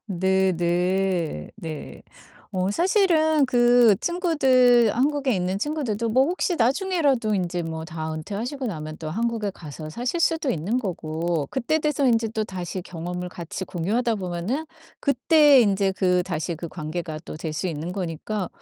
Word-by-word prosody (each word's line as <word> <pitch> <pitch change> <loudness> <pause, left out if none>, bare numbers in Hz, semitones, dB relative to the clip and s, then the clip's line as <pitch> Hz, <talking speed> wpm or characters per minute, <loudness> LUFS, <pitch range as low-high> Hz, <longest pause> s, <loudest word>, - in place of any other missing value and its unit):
네네. 180 - 0
네. 155 -3 -8 0.5
어 185 0 0
사실은 325 - +3
그 240 -4 +5
친구들 260 - +3
한국에 275 -2 +1
있는 185 +1 -1
친구들도 235 -5 -2
뭐 255 +4 +4
혹시 355 +1 0
나중에라도 270 - +1
인제 175 -2 -1
뭐 160 0 -5
다 160 -1 -5
은퇴하시고 225 - -4
나면 155 -6 -5
또 155 -1 -5
한국에 225 +1 -1
가서 155 -3 -9
사실 245 - -2
수도 325 -4 +1
있는 195 +9 -1
거고 165 - -2
그때 265 +5 0
돼서 295 -2 +1
인제 230 -2 +2
또다시 190 -5 -4
경험을 180 +1 -5
같이 175 +1 -6
공유하다 220 +8 -1
보면은 190 - -3 0.4
그때 290 0 +5
인제 195 -3 +2
그 180 -1 +2
다시 175 -1 -3
인제 165 - -5
그 170 0 -6
관계가 155 0 -5
또 - - -7
될 160 0 -4
수 155 +5 -2
있는 165 0 -4
거니까 185 +2 -3
195 Hz, 305 characters per minute, -24 LUFS, 170-255 Hz, 0.5 s, 그